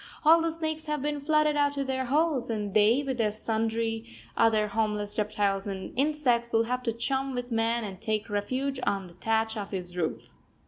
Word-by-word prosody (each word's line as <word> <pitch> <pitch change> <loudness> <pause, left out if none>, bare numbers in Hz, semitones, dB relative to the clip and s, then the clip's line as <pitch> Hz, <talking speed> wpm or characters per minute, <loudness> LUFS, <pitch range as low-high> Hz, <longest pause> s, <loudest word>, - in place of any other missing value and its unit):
All 325 +2 +7
the 330 0 0
snakes 315 -1 -3
have 300 -3 -2
been 295 -1 -2
flooded 305 0 +3
out 285 -1 +1
of 275 - 0
their 260 0 -1
holes, 285 -2 +1
and 210 -3 -2
they, 220 +6 +4
with 260 -3 -1
sundry 225 +1 -2 0.2
other 220 -2 +3
homeless 210 -1 -1
reptiles 205 -2 0
and 190 -1 -5
insects, 255 -4 +1
will 225 0 +3
have 250 +2 -2
to 240 -2 -1
chum 265 +3 -1
with 245 0 -4
man 230 +1 +1
and 195 -3 -7
take 215 0 -1
refuge 255 +6 -2
on 195 -5 -1
the 175 - -13
thatch 220 +4 0
of 205 -2 -4
his 180 -2 -4
roof. 165 -3 -2
230 Hz, 190 wpm, -28 LUFS, 210-275 Hz, 0.2 s, All